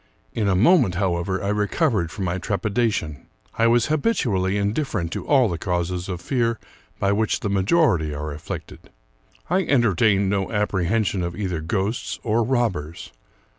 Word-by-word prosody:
In 105 - -1
a 95 - +2
moment, 120 - +4
however, 95 0 -1
I 100 - -1
recovered 105 - +1
from 95 +3 -4
my 90 +1 -2
trepidation. 100 - -1 0.3
I 115 - +5
was 120 0 +3
habitu 150 - 0
ally 95 +1 0
indifferent 105 - -1
to - - -5
all 135 -4 +4
the 85 -4 -3
causes 90 0 -2
of 90 -2 -4
fear 115 +2 0 0.4
by 100 - +1
which 105 +1 0
the 100 - -2
ma 100 -1 +2
jority 100 - +2
are 75 0 -4
afflicted. 75 - -8 0.6
I 185 +3 +2
entertained 110 - +2
no 95 -1 -1
apprehension 105 -1 0
of 85 0 -3
either 90 -6 -2
ghosts 100 +6 -2
or 115 +1 +1
robbers. 110 - -2
100 Hz, 160 wpm, -23 LUFS, 90-115 Hz, 0.6 s, I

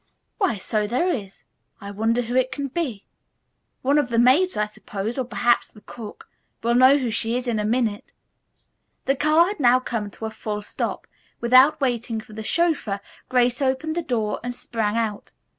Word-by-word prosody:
"Why, 380 - +1
so 210 +2 -1
there 255 - +1
is. 200 - -4 0.4
I 200 0 -8
wonder 225 +4 0
who 240 +2 -4
she 255 -1 +4
can 275 +2 -5
be. 255 - -3 0.8
One 280 +3 +3
of 270 -4 -1
the 235 - -1
maids, 270 +11 +4
I 210 - +2
suppose, 210 +2 -5
or 255 - -1
perhaps 240 0 +1
the 210 - -17
cook. 220 -2 -10 0.4
We'll 235 +1 +2
know 260 +3 +6
who 250 -5 -2
she 230 +2 -1
is 250 - -4
in 235 -3 -1
a 210 - -1
minute." 220 -2 -1 0.9
The 270 - +2
car 305 +4 +4
had 400 0 -4
now 250 -2 +5
come 230 -5 -3
to 220 - -8
a 220 - -4
full 210 -1 -5
stop. - - -4 0.3
Without 260 +6 +5
waiting 240 -4 -1
for 215 0 -13
the 220 - -6
chauffeur 310 - 0 0.3
Grace 245 0 +2
opened 270 +4 0
the 345 - 0
door 225 -8 -1
and 245 0 -4
sprang 225 -3 -2
out. 220 -3 -3
240 Hz, 190 wpm, -23 LUFS, 220-265 Hz, 0.9 s, know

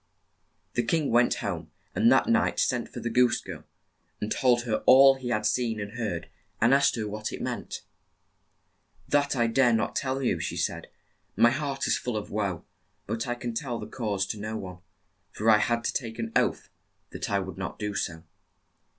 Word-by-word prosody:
The 120 - +1
king 150 +5 0
went 120 +1 +4
home, - - -4 0.2
and - - +4
that - - +5
night - - +2
sent - - 0
for - - -7
the 120 - -2
goose 125 0 +3
girl, - - -9 0.5
and 105 - -4
told 120 -2 +3
her 115 -3 0
all 135 +1 +9
he 130 -2 -6
had 105 -3 0
seen 115 -1 0
and 100 0 -5
heard, 105 -8 -4 0.3
and 115 +4 +4
asked 140 0 +4
her 110 -3 -3
what 105 +1 -4
it - - -6
meant. - - -5 1.2
"That 145 -1 +2
I 120 -2 +2
dare 120 +1 +3
not 110 - 0
tell 135 0 -1
you," 95 -8 +1
she 85 0 -3
said. 85 0 -2 0.5
"My 120 - +5
heart 140 -1 -2
is - - +1
full 125 -3 -3
of 105 - -6
woe, 100 -5 -2 0.4
but 115 +2 -3
I 120 - -1
can 120 -1 -5
tell 120 0 -3
the - - -6
cause 105 -6 -2
to 105 - -4
no 110 +1 -4
one, 90 -2 -8 0.5
for 110 +2 +2
I 105 - +6
had 115 +1 0
to - - -1
take 115 -3 -4
an 115 -1 -4
oath - - +1 0.4
that - - -5
I 100 - +2
would 95 -1 -5
not 95 - -5
do 105 -1 -3
so." 80 -4 -3
115 Hz, 200 wpm, -27 LUFS, 105-125 Hz, 1.2 s, all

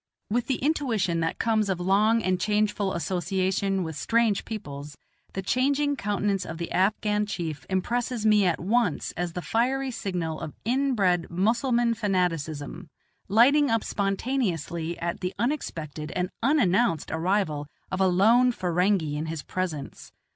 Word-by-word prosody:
With 240 +2 0
the 265 - +1
intuition 240 - 0
that 165 0 -1
comes 220 -3 +1
of 185 -2 -1
long 210 +5 +3
and 185 -1 +1
changeful 210 -1 +1
association 185 +3 0
with 160 -2 -5
strange 225 +6 +1
peoples, 145 -9 -7 0.4
the 195 - -4
changing 280 +6 +1
countenance 205 -4 -1
of 165 - -6
the 170 0 -5
Afghan 210 +2 +1
chief 160 -9 -4
impresses 235 +4 -1
me 210 -3 +5
at 170 - +1
once 205 -2 0
as 175 -1 -3
the 180 - -4
fiery 260 +3 0
signal 180 -8 -3
of 150 - -7
inbred 225 -9 +1
Mussulman 235 +6 +2
fanaticism, 175 -6 -2 0.4
lighting 270 +8 +5
up 225 -1 +1
spontaneously 195 - -1
at 170 0 -3
the 180 +1 -3
unexpected 165 - -3
and 180 +1 -1
unannounced 235 - +2
arrival 160 -3 0 0.2
of 185 - -1
a 190 - +5
lone 225 +8 +5
Ferenghi 180 -5 +1
in 155 +2 -3
his 160 -2 -4
presence. 170 -7 -5
195 Hz, 140 wpm, -26 LUFS, 170-230 Hz, 0.4 s, me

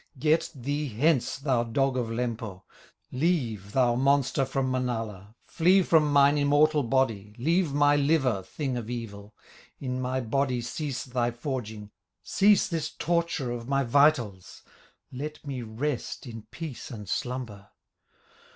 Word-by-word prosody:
Get 155 +5 +2
thee 145 +3 -2
hence, 130 +3 +1
thou 135 -4 +1
dog 135 +3 0
of 125 -2 -1
Lempo, 115 -5 -4 0.5
Leave, 125 - -1
thou 125 -2 +3
monster 135 +1 +2
from 130 -1 -1
Manala, 115 -5 -3
Flee 185 +3 +3
from 155 -4 +3
mine 140 +1 +5
immortal 145 +1 +4
body, 115 -5 0
Leave 165 +5 +1
my 145 +1 +4
liver, 140 -7 +2
thing 130 +5 -4
of 115 -2 -5
evil, 105 -4 -7 0.4
In 130 -1 -3
my 130 +1 -1
body 130 +1 0
cease 130 +3 -4
thy 125 -3 -1
forging, 120 -4 -5 0.3
Cease 205 0 +4
this 165 -3 -2
torture 170 -6 -1
of 120 -1 -5
my 140 0 +2
vitals, 120 - +2 0.5
Let 150 +4 -7
me 135 -3 -4
rest 120 +6 -4
in 115 -3 -9
peace 160 -3 -7
and 105 -5 -8
slumber. 115 -3 -4
130 Hz, 135 wpm, -27 LUFS, 115-145 Hz, 0.5 s, mine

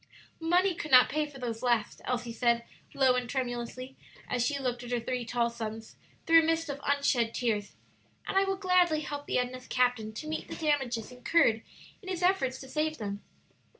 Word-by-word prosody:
"Money 355 +3 +3
could 310 -2 -6
not 255 -2 +7
pay 305 +2 0
for 290 -2 -12
those 235 -3 -4
last," 235 -4 0
Elsie 245 -2 -2
said, 235 0 +2 0.3
low 265 -2 +4
and 250 -1 -2
tremulously, 255 0 -4 0.3
as 245 -1 0
she 280 +3 0
looked 250 -3 -2
at 240 - -8
her 245 -1 0
three 250 +1 -3
tall 235 0 0
sons 225 -1 -6 0.3
through 330 0 +7
a - - +2
mist 325 0 0
of 285 0 -5
unshed 280 -5 +1
tears; 215 -4 -1 0.5
"and - - -3
I 390 - +5
will 390 0 -1
gladly 360 -4 +3
help 290 -1 -6
the - - 0
Edna's 250 0 -3
captain 245 -4 +1
to 260 +8 -7
meet 315 0 -4
the - - -6
damages 265 -8 -1
incurred 250 -2 +2 0.4
in 375 - -9
his 365 -1 -3
efforts 275 -9 +2
to 265 - -9
save 310 +3 -1
them." 200 -1 -5
255 Hz, 195 wpm, -30 LUFS, 235-310 Hz, 0.5 s, not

